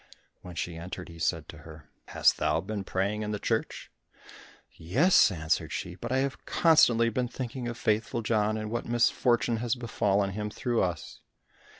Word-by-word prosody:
When 90 -1 -10
she 85 0 -4
entered, 90 +1 -7
he 85 0 -12
said - - -1
to - - -10
her, 80 -2 -13 0.2
"Hast - - +3
thou 75 +1 +1
been 100 +3 -4
praying 100 +3 -1
in 105 - -3
the 105 - -2
church?" - - -3 0.8
"Yes," 120 - +4
answered 80 -2 -1
she, 85 +4 -4
"but 90 - -7
I 130 - +2
have 140 - -7
constantly 120 -8 +4
been 125 +2 -1
thinking 125 0 -5
of 120 -1 -5
Faithful 110 +1 0
John 110 -1 +1
and 110 0 -5
what 120 - -3
misfortune 120 0 +2
has 115 +1 -1
befallen 105 -5 0
him 105 +2 -4
through 120 +2 -1
us." 90 -4 -3
105 Hz, 175 wpm, -28 LUFS, 90-120 Hz, 0.8 s, Yes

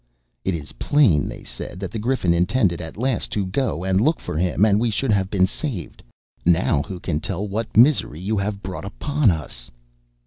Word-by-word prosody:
"It 95 - 0
is 75 -3 -7
plain," 115 - +3
they - - -8
said, 90 - -7
"that 95 -2 -5
the 110 - -4
Griffin 110 -6 +1
intended 90 0 +1
at 80 +2 -8
last 125 0 0
to 100 -2 0
go 95 -2 -1
and 95 +1 +2
look 155 +7 +2
for - - -6
him, 90 +5 +2
and 105 -1 +3
we 120 +1 +1
should 115 +3 0
have 95 -2 +1
been 95 -2 +3
saved. 105 - -5 0.4
Now 80 -4 +3
who 95 +2 -7
can 80 -4 -2
tell 95 +5 -3
what 105 +2 -3
misery 120 - +4
you 100 +3 -1
have 100 0 -3
brought 95 0 -5
upon 145 +6 +1
us." 75 -7 -4
100 Hz, 200 wpm, -22 LUFS, 90-115 Hz, 0.4 s, misery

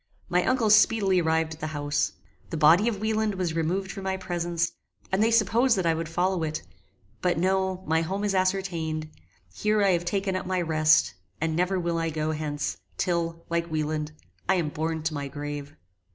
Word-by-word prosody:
My 180 0 +2
uncle 240 -5 +2
speedily 205 -3 +5
arrived 160 0 +1
at 155 - -13
the 155 - -3
house. 145 0 0 0.4
The 165 - -3
body 165 +8 +6
of 220 -4 -1
Wieland 220 -1 0
was 180 -3 -1
removed 180 +4 -1
from 195 -1 -7
my 190 0 -1
presence, 170 -2 -1 0.4
and 190 +2 +2
they 225 - +4
supposed 230 +2 +3
that 185 - 0
I 165 - +3
would 165 0 -3
follow 180 +1 0
it; 155 -1 -3 0.6
but 180 -2 +1
no, 190 +1 0
my 160 +1 +2
home 195 +5 -2
is 205 -1 +1
ascertained; 175 -5 -1 0.4
here 210 - +1
I 195 - +4
have 175 -1 +1
taken 195 +1 -1
up 185 - -3
my 185 -1 0
rest, 155 - +3 0.3
and 160 0 -1
never 180 +2 +1
will 170 -1 -1
I 165 0 0
go 155 0 -1
hence, 150 -2 -3 0.2
till, 170 -1 -1
like 170 0 -1
Wieland, 155 -1 -2 0.4
I 190 - +5
am 170 -4 0
borne 160 +1 -3
to 160 0 -1
my 145 -2 -3
grave. 145 +1 -6
170 Hz, 195 wpm, -26 LUFS, 160-190 Hz, 0.6 s, body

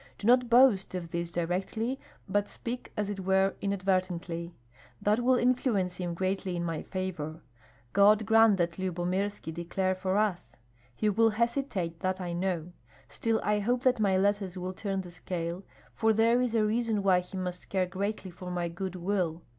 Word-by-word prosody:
Do - - -7
not 245 +1 +5
boast 235 -7 +5
of 170 -2 -5
this 170 -1 -3
directly, 190 +9 -2 0.3
but 205 +1 0
speak 245 +1 -6
as 210 -1 0
it 200 - -5
were 190 +1 +2
inadvertently. 185 -3 -1 0.4
That 210 +2 +2
will 255 +1 +4
influence 245 -8 +1
him 175 -2 -3
greatly 190 0 -1
in 170 - -2
my 165 -2 -2
favor. 170 -4 -5 0.5
God 210 +2 +5
grant 225 -1 +6
that 170 0 -1
Lyubomirski 185 0 -2
declare 180 +3 -1
for 185 +1 -1
us. 210 -4 -1 0.4
He 215 - 0
will 225 +2 +4
hesitate, 220 -7 -1
that 185 0 -1
I 175 -2 -3
know; 175 -1 -2 0.4
still 225 -1 0
I 210 +1 +2
hope 245 +4 0
that 255 -2 +3
my 195 -3 +3
letters 195 -1 0
will 185 +1 -4
turn 195 0 -2
the 180 -2 -10
scale, 175 0 -4 0.3
for 220 0 +2
there 230 +3 +4
is 245 -2 0
a 215 -1 +3
reason 220 -1 0
why 185 -2 +5
he 180 +2 -8
must 180 -1 -5
care 190 -2 +1
greatly 195 +1 -3
for 180 +1 -8
my 175 -1 -2
good 185 +2 -5
will. 175 -3 -1
190 Hz, 175 wpm, -29 LUFS, 180-215 Hz, 0.5 s, grant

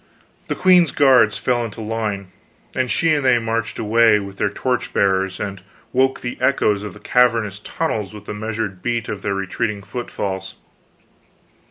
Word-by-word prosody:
The - - -2
queen's 180 -4 +5
guards 125 -7 +5
fell 120 -1 0
into 115 -1 -7
line, 105 -3 -3 0.4
and 130 -1 -1
she 165 +4 +2
and 145 -2 +1
they 130 -2 +5
marched 115 -1 -2
away, 115 0 +4
with 100 -1 -8
their - - +1
torch 125 +4 -2
bearers, 95 -1 +1
and 100 -2 -5 0.3
woke 130 +1 +2
the 120 - -5
echoes 105 -7 +2
of 105 -3 -7
the - - -12
cavernous 115 -3 +2
tunnels 105 -5 -3
with 105 -1 -11
the - - -5
measured 105 -3 -4
beat 120 -2 -2
of 105 -2 -4
their 100 - -1
retreating 100 +2 -2
footfalls. 95 -4 -5
110 Hz, 165 wpm, -20 LUFS, 100-120 Hz, 0.4 s, queen's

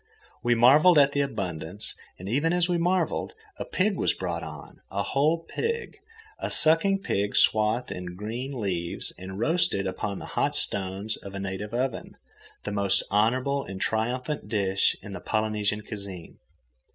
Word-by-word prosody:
We 120 0 +3
marvelled 150 +9 +7
at 140 -1 +6
the 145 - +1
abundance, 90 - -4 0.2
and, 95 - -8
even 145 - +1
as 175 -1 +3
we 175 -1 +1
marvelled, 180 - 0 0.3
a - - -3
pig 195 +1 0
was - - +1
brought 85 -2 -3
on, 75 -2 -10
a 100 +1 -1
whole 155 - +1
pig, 465 -1 -3 0.4
a - - -2
sucking 195 +5 +3
pig, 100 - 0
swathed 110 +3 +3
in 90 -1 -6
green 120 +7 -5
leaves 90 -5 -2
and 95 +1 -7
roasted 160 - +2
upon 100 +1 -3
the - - -7
hot - - +1
stones 100 +2 -2
of 100 0 -10
a - - -3
native 100 +2 -4
oven, 130 0 -2 0.5
the 105 - -4
most 100 -1 +3
honourable 130 +7 +2
and 95 -1 -7
triumphant 125 +7 -1
dish 100 -3 +1
in 100 - -8
the - - -5
Polynesian 105 -1 0
cuisine. 100 -5 -8
110 Hz, 160 wpm, -27 LUFS, 95-140 Hz, 0.5 s, marvelled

